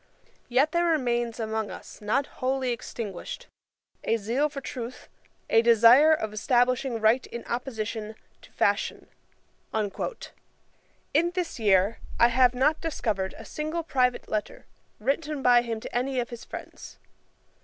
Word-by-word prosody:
Yet 265 +5 +3
there 345 0 +2
remains 240 -7 +1
still 225 -2 -3
among 220 -1 -2
us, - - -10
not 215 +7 +1 0.2
wholly 260 0 0
extinguished, 220 -5 -6 0.6
a 225 - +1
zeal 240 +8 0
for 280 - -6
truth, 250 -2 -7 0.4
a 225 - +5
desire 235 +6 +7
of 220 -9 0
establishing 245 +2 +1
right 220 +4 +3
in 235 - -7
opposition 220 -3 -4 0.3
to - - -17
fashion". - - 0 0.6
In 295 - -4
this 355 -8 -3
year 200 0 +3 0.2
I 235 - +6
have 250 0 +4
not 300 +5 +2
discovered 215 - -2
a - - -10
single 310 +2 -3
private 255 -5 +1
letter, 215 -1 -4 0.3
written 280 +4 -1
by 245 -1 +6
him 230 -2 -4
to - - -8
any 255 +1 0
of 240 0 -3
his 235 - -8
friends. - - -9
245 Hz, 140 wpm, -27 LUFS, 220-275 Hz, 0.6 s, desire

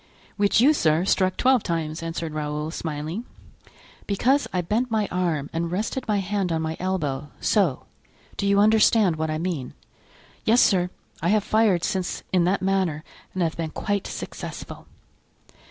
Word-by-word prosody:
"Which 205 0 +3
you, 280 +6 +6
sir, 160 - +2
struck 185 -1 +2
twelve 260 -2 +4
times," 165 -3 -3
answered 165 -1 -4
Raoul, 150 0 -3
smiling. 160 +6 -4 0.8
"Because 255 +8 +2
I 180 - 0
bent 220 +8 0
my 215 -2 +1
arm 170 -6 0
and 165 0 -2
rested 220 +8 -2
my 210 -1 +2
hand 195 -1 -1
on 160 -1 0
my 160 0 -2
elbow—so; 155 - -1 0.5
do 200 - -1
you 200 0 +4
understand 215 -4 +4
what 160 0 -1
I 155 - -1
mean?" 165 -6 -3 0.7
"Yes, 230 +3 +4
sir. 180 -6 +4 0.3
I 165 - 0
have 210 0 +3
fired 210 -6 +2
since 185 -1 -2
in 180 -2 +4
that 190 +2 +1
manner 190 -6 0 0.3
and 185 - +1
have 165 -1 -1
been 165 -1 -2
quite 205 +4 -2
successful." - - -7
180 Hz, 155 wpm, -24 LUFS, 160-205 Hz, 0.8 s, you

